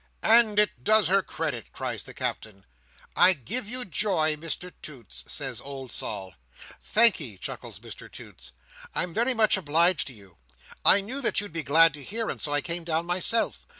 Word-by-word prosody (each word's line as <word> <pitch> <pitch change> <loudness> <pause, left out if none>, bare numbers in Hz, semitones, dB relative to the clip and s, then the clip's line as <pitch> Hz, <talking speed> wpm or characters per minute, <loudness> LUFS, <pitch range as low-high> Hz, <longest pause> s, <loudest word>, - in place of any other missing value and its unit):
"And 225 -2 +5
it 210 -12 +1
does 215 -2 +4
her 195 +1 +3
credit!" 150 - -5
cries - - -5
the - - -12
Captain. 100 -3 -5 0.5
"I 185 +1 +7
give 205 - -4
you 250 +1 -1
joy, 160 -4 +1
Mr 165 +3 -5
Toots!" 130 -9 -9
says 130 -5 -2
old 135 -3 -8
Sol. 95 -2 -3 0.5
"Thank'ee," 175 - +3
chuckles - - -8
Mr - - -11
Toots, 65 0 -12 0.4
"I'm 180 -2 -2
very 240 +5 0
much 215 -3 +3
obliged 170 +1 +3
to 130 - -8
you. 100 - -16 0.4
I 200 - +6
knew 255 +8 -5
that 240 - +1
you'd 205 -5 -6
be 165 - -3
glad 160 +2 +5
to 145 -1 -9
hear, 225 - -4
and - - -6
so 145 - -3
I 145 0 +2
came 170 +2 -2
down 165 0 -1
myself. 185 +6 -1
165 Hz, 180 wpm, -26 LUFS, 140-210 Hz, 0.5 s, I